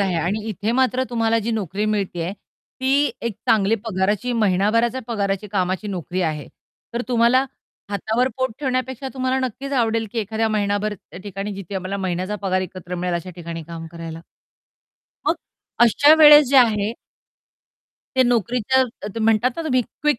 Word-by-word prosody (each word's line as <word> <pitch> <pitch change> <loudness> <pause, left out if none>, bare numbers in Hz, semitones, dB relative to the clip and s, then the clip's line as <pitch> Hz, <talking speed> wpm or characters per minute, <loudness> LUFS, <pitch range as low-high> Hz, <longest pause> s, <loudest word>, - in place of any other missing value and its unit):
आहे 190 -3 +1
आणि 175 +6 0
इथे 210 +2 -2
मात्र 260 0 +2
तुम्हाला 230 -1 +2
जी 235 - -1
नोकरी 205 -2 -2
मिळतेय, 195 -5 -1 0.5
ती 275 +2 +3
एक 235 -1 -2 0.2
चांगली 215 0 +4
पगाराची 210 +3 0
महिनाभराच्या 225 +3 +2
पगाराची 200 -2 -1
कामाची 185 +1 -1
नोकरी 185 -1 -3
आहे. 155 -3 -2 0.5
तर 240 - -1
तुम्हाला 245 +2 +4 0.5
हातावर 220 +5 0
पोट 260 0 0
ठेवण्यापेक्षा 260 -1 -2
तुम्हाला 260 0 0
नक्कीच 275 +4 -7
आवडेल, 230 -3 +1
की 235 - -2
एखाद्या 220 +1 -1
महिनाभर 210 0 0
त्या 180 - -13
ठिकाणी 200 +1 -5
जिथे 195 0 -8
आम्हाला 190 +1 -3
महिन्याचा 185 +1 -2
पगार 185 -1 +1
एकत्र 180 0 -7
मिळेल 180 0 -2
अशा 170 +2 -4
ठिकाणी 170 -1 -6
काम 165 -1 -7
करायला. 165 -1 -7 1.1
मग - - +2 0.5
अशा 285 +7 +6
वेळेस 295 -3 +9
जे 275 - +5
आहे 220 -3 +3 1.2
ते 260 - +6
नोकरीचं 245 +2 +2 0.4
म्हणतात 225 +2 +3
ना, 330 - -3
तुम्ही 260 -6 +2
क्विक 270 +3 -1
215 Hz, 150 wpm, -22 LUFS, 190-245 Hz, 1.2 s, वेळेस